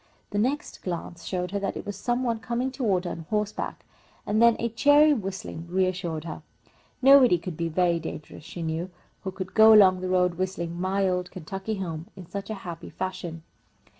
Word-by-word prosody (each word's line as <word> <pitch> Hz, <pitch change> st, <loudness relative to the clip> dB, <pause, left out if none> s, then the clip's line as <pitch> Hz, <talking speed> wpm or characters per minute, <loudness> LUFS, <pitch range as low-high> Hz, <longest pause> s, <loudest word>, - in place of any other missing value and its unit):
The 205 Hz, -, 0 dB
next 265 Hz, +7 st, -1 dB
glance 170 Hz, -1 st, -5 dB
showed 180 Hz, -1 st, -2 dB
her 200 Hz, -, -1 dB
that 200 Hz, -, -3 dB
it -, -, -7 dB
was 205 Hz, -1 st, -4 dB
some 240 Hz, +5 st, -1 dB
one 230 Hz, -2 st, 0 dB
coming 240 Hz, +3 st, -2 dB
toward 210 Hz, -9 st, 0 dB
her 175 Hz, -, -2 dB
on 165 Hz, -1 st, -7 dB
horseback, 210 Hz, -1 st, -2 dB, 0.4 s
and 215 Hz, +2 st, +1 dB
then 235 Hz, -1 st, +7 dB
a 235 Hz, -, -1 dB
cheery 290 Hz, +6 st, +5 dB
whistling 195 Hz, -, -5 dB
reassured 180 Hz, -3 st, -1 dB
her. 165 Hz, -1 st, -7 dB, 0.6 s
Nobody 265 Hz, -8 st, +7 dB
could 170 Hz, 0 st, -6 dB
be 165 Hz, +1 st, -2 dB
very 170 Hz, 0 st, +2 dB
dangerous, 155 Hz, -2 st, -8 dB
she 170 Hz, +2 st, -7 dB
knew, 160 Hz, +3 st, -2 dB, 0.3 s
who 190 Hz, -, -2 dB
could 185 Hz, 0 st, -6 dB
go 220 Hz, 0 st, +8 dB
along 185 Hz, -3 st, +6 dB
the 185 Hz, -, -3 dB
road 180 Hz, -1 st, +2 dB
whistling 175 Hz, -2 st, -3 dB
"My 190 Hz, +1 st, +1 dB
Old 180 Hz, -1 st, -1 dB
Kentucky 195 Hz, +5 st, -5 dB
Home" 170 Hz, -4 st, -5 dB
in 185 Hz, -2 st, -10 dB
such 200 Hz, +4 st, -6 dB
a 220 Hz, -, -2 dB
happy 170 Hz, -2 st, -7 dB
fashion. 180 Hz, -3 st, -5 dB
185 Hz, 195 wpm, -26 LUFS, 175-215 Hz, 0.6 s, go